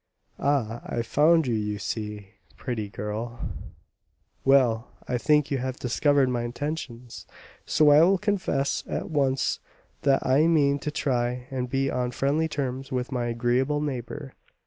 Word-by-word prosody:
Ah, 120 Hz, -5 st, 0 dB
I've 115 Hz, 0 st, -3 dB
found 160 Hz, +5 st, +4 dB
you 120 Hz, -, 0 dB
out, 110 Hz, -, +1 dB
you 105 Hz, 0 st, -2 dB
see, 105 Hz, -1 st, -5 dB, 0.3 s
pretty 110 Hz, -5 st, -4 dB
girl 105 Hz, +4 st, -5 dB, 0.5 s
" 85 Hz, +3 st, -45 dB
"Well, 125 Hz, -4 st, +4 dB, 0.2 s
I 125 Hz, -, -1 dB
think 150 Hz, +4 st, +2 dB
you 135 Hz, -, +1 dB
have 130 Hz, 0 st, -3 dB
discovered 140 Hz, +2 st, +2 dB
my 125 Hz, -1 st, -1 dB
intentions, 120 Hz, -1 st, -5 dB, 0.4 s
so 150 Hz, -1 st, +5 dB
I 145 Hz, +1 st, +8 dB
will 190 Hz, +4 st, +5 dB
confess 185 Hz, -9 st, 0 dB
at -, -, -4 dB
once 135 Hz, -3 st, +1 dB, 0.4 s
that 135 Hz, -1 st, +2 dB
I 140 Hz, +5 st, +4 dB
mean 145 Hz, -4 st, +3 dB
to 150 Hz, -, -3 dB
try 125 Hz, -4 st, -1 dB
and 125 Hz, -2 st, -3 dB
be 135 Hz, +1 st, 0 dB
on 125 Hz, -1 st, -1 dB
friendly 140 Hz, +6 st, 0 dB
terms 135 Hz, -3 st, -4 dB
with 125 Hz, 0 st, -2 dB
my 120 Hz, -2 st, -1 dB
agreeable 120 Hz, +5 st, +1 dB
neighbour." 140 Hz, -1 st, -5 dB
130 Hz, 155 wpm, -26 LUFS, 120-145 Hz, 0.5 s, I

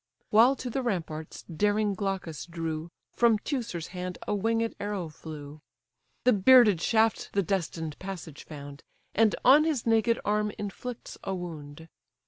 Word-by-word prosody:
While 235 Hz, +5 st, +6 dB
to 255 Hz, -2 st, -5 dB
the 265 Hz, -, -1 dB
ramparts 165 Hz, -9 st, -4 dB
daring 205 Hz, +4 st, +1 dB
Glaucus 190 Hz, -, -4 dB
drew, 165 Hz, -1 st, -4 dB, 0.2 s
From 235 Hz, -2 st, +4 dB
Teucer's 215 Hz, -, -4 dB
hand 180 Hz, 0 st, -5 dB
a -, -, 0 dB
winged 225 Hz, +2 st, 0 dB
arrow 200 Hz, -5 st, -3 dB
flew; 150 Hz, -1 st, -10 dB, 0.6 s
The 250 Hz, -, +5 dB
bearded 210 Hz, -3 st, +6 dB
shaft 225 Hz, +2 st, +2 dB
the 200 Hz, -, +2 dB
destined 165 Hz, -4 st, -3 dB
passage 180 Hz, -6 st, -7 dB
found, 145 Hz, -2 st, -10 dB, 0.3 s
And 220 Hz, 0 st, +3 dB
on 280 Hz, +4 st, +8 dB
his 310 Hz, -7 st, -1 dB
naked 230 Hz, 0 st, +3 dB
arm 210 Hz, 0 st, +1 dB
inflicts 225 Hz, +4 st, -6 dB
a 195 Hz, -, -2 dB
wound. 160 Hz, -3 st, -8 dB
195 Hz, 140 wpm, -28 LUFS, 165-225 Hz, 0.6 s, on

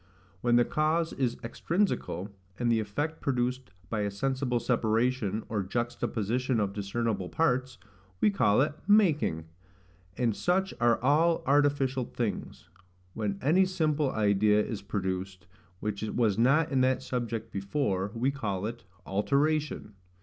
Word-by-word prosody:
When 120 Hz, 0 st, +3 dB
the 120 Hz, 0 st, +5 dB
cause 160 Hz, +2 st, 0 dB
is 125 Hz, -3 st, -1 dB
extrinsical, 115 Hz, -, -1 dB, 0.3 s
and 120 Hz, -1 st, +1 dB
the 115 Hz, -, +3 dB
effect 145 Hz, +10 st, -3 dB
produced 125 Hz, -2 st, -1 dB, 0.2 s
by 110 Hz, +4 st, -2 dB
a 105 Hz, -1 st, 0 dB
sensible 125 Hz, +4 st, -1 dB
separation, 115 Hz, -2 st, 0 dB
or 105 Hz, -2 st, -1 dB
juxta 120 Hz, +5 st, -2 dB
position 120 Hz, +3 st, -1 dB
of 100 Hz, -2 st, -1 dB
discernible 100 Hz, -1 st, -2 dB
parts, 130 Hz, -5 st, 0 dB, 0.4 s
we 210 Hz, -, +4 dB
call 115 Hz, -, +3 dB
it 150 Hz, +1 st, +1 dB
MAKING; 160 Hz, -, +3 dB, 0.7 s
and 115 Hz, -4 st, +1 dB
such 190 Hz, +2 st, 0 dB
are 120 Hz, -1 st, +4 dB
all 160 Hz, +5 st, +3 dB
artificial 140 Hz, -2 st, +2 dB
things. 115 Hz, -7 st, -4 dB, 0.5 s
When 105 Hz, -3 st, -2 dB
any 175 Hz, +7 st, +4 dB
simple 155 Hz, -6 st, 0 dB
idea 105 Hz, 0 st, +3 dB
is 105 Hz, -3 st, -5 dB
produced, 95 Hz, -1 st, -4 dB, 0.4 s
which 105 Hz, -1 st, -3 dB
was 110 Hz, -1 st, +1 dB
not 135 Hz, +8 st, +3 dB
in 135 Hz, -2 st, +2 dB
that 130 Hz, 0 st, +2 dB
subject 115 Hz, -3 st, -3 dB
before, 100 Hz, -1 st, -1 dB
we 125 Hz, +4 st, +1 dB
call 105 Hz, -8 st, -3 dB
it 115 Hz, +1 st, -6 dB, 0.2 s
ALTERATION. 140 Hz, +3 st, 0 dB
120 Hz, 135 wpm, -29 LUFS, 105-140 Hz, 0.7 s, the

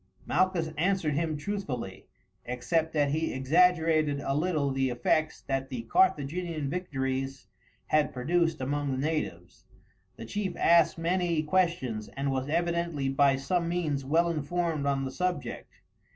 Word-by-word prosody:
Malchus 175 Hz, -2 st, +1 dB
answered 180 Hz, -3 st, +1 dB
him 155 Hz, +1 st, -1 dB
truthfully, 145 Hz, -, -5 dB, 0.4 s
except 160 Hz, +7 st, -1 dB
that 145 Hz, -2 st, +1 dB
he 160 Hz, +2 st, 0 dB
exaggerated 155 Hz, +1 st, +3 dB
a 135 Hz, -, -2 dB
little 150 Hz, -2 st, 0 dB
the 135 Hz, 0 st, 0 dB
effects 155 Hz, +6 st, 0 dB
that 135 Hz, 0 st, -2 dB
the 125 Hz, -4 st, -4 dB
Carthaginian 160 Hz, +1 st, +1 dB
victories 135 Hz, -6 st, -3 dB, 0.4 s
had 155 Hz, -1 st, +2 dB
produced 165 Hz, +5 st, 0 dB
among 145 Hz, +2 st, -1 dB
the 130 Hz, -, -1 dB
natives. 120 Hz, -, -3 dB, 0.5 s
The -, -, -8 dB
chief 195 Hz, -, -3 dB
asked 170 Hz, -1 st, +4 dB
many 170 Hz, -1 st, 0 dB
questions, 150 Hz, -10 st, 0 dB
and 140 Hz, 0 st, 0 dB
was 135 Hz, +1 st, -2 dB
evidently 170 Hz, -3 st, 0 dB
by 135 Hz, 0 st, +4 dB
some 170 Hz, +6 st, -1 dB
means 155 Hz, -6 st, -1 dB
well 165 Hz, +6 st, +2 dB
informed 160 Hz, -1 st, -1 dB
on 135 Hz, -1 st, 0 dB
the 130 Hz, -, -4 dB
subject. 180 Hz, +4 st, -3 dB
155 Hz, 135 wpm, -29 LUFS, 135-170 Hz, 0.5 s, asked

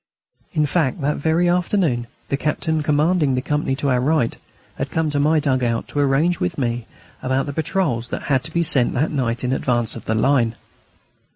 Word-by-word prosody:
In 150 Hz, -, +2 dB
fact, 150 Hz, -2 st, 0 dB
that 145 Hz, +2 st, 0 dB
very 160 Hz, +4 st, +2 dB
afternoon 175 Hz, -, +1 dB, 0.2 s
the -, -, +1 dB
captain 155 Hz, +2 st, -1 dB
commanding 150 Hz, -1 st, +2 dB
the 125 Hz, -, 0 dB
company 150 Hz, -2 st, 0 dB
to 140 Hz, +1 st, -1 dB
our 125 Hz, -, +3 dB
right 135 Hz, -3 st, +1 dB, 0.4 s
had -, -, -2 dB
come 160 Hz, -2 st, 0 dB
to 145 Hz, -, 0 dB
my 155 Hz, +2 st, +3 dB
dug 130 Hz, -3 st, 0 dB
out 115 Hz, -1 st, -1 dB
to 145 Hz, -, -3 dB
arrange 145 Hz, +5 st, +2 dB
with 90 Hz, -, -2 dB
me 120 Hz, -3 st, -2 dB, 0.3 s
about 130 Hz, +1 st, 0 dB
the 145 Hz, -, -5 dB
patrols 155 Hz, -7 st, -1 dB
that -, -, -4 dB
had 135 Hz, -3 st, +1 dB
to 160 Hz, -, -7 dB
be 170 Hz, +1 st, +1 dB
sent 135 Hz, -6 st, +3 dB
that 145 Hz, +6 st, 0 dB
night 125 Hz, -5 st, -1 dB
in 125 Hz, +1 st, 0 dB
advance 120 Hz, -4 st, 0 dB
of -, -, -9 dB
the 110 Hz, -, 0 dB
line. 120 Hz, -1 st, +2 dB
140 Hz, 200 wpm, -21 LUFS, 125-160 Hz, 0.4 s, our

